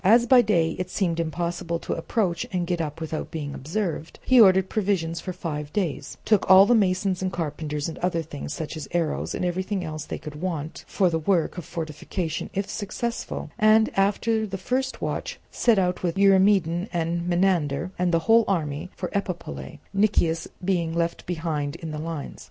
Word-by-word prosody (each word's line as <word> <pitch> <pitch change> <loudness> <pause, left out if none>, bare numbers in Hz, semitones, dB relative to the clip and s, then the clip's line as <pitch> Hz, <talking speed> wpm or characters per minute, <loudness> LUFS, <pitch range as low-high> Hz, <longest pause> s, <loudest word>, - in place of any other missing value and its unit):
As 230 +5 +6
by 250 0 +7
day 170 -7 +2
it 185 0 -3
seemed 175 -4 0
impossible 170 +1 -2
to - - -4
approach 170 0 -1
and 180 -2 -1
get 175 -1 -1
up 150 -1 -4
without 160 -1 -4
being 145 -3 -5
observed, 165 +2 -3
he 255 -2 +7
ordered 190 -2 +6
provisions 185 -6 0
for 185 - -4
five 150 -5 -5
days, 160 -8 -2
took 215 -3 +2
all 190 +1 +9
the 240 - +4
masons 190 -3 +2
and 185 -1 -1
carpenters, 150 -3 -3
and 165 - -6
other 175 -2 0
things, 145 -2 -7
such 160 +1 -4
as 155 -3 -6
arrows, 170 -3 -1
and - - -2
everything 185 +2 -1
else 155 -2 -5
that - - -24
they - - -3
could 150 -1 -9
want 165 -4 -4
for 185 -4 +2
the 160 - 0
work 170 0 +1
of 170 - -8
fortification 165 +1 -4
if 195 +1 -1
successful, 230 +3 -4
and, 215 +1 +5
after 215 +3 +1
the 195 -1 -4
first 260 +7 -2
watch, - - -3
set 235 -3 +3
out 180 -1 +1
with 175 0 -1
Eurymedon 195 -2 +4
and 170 0 -1
Menander 175 -3 +1
and 180 -1 +2
the 165 -1 +1
whole 230 +1 +6
army 155 -3 -1
for 180 - -4
Epipolae, 190 -3 -4 0.2
Nicias 195 -5 +2 0.2
being 170 -4 0
left 170 0 -1
behind 160 -4 -2
in 165 -2 -6
the 150 - -4
lines. 160 -2 -5
175 Hz, 185 wpm, -25 LUFS, 160-195 Hz, 0.2 s, all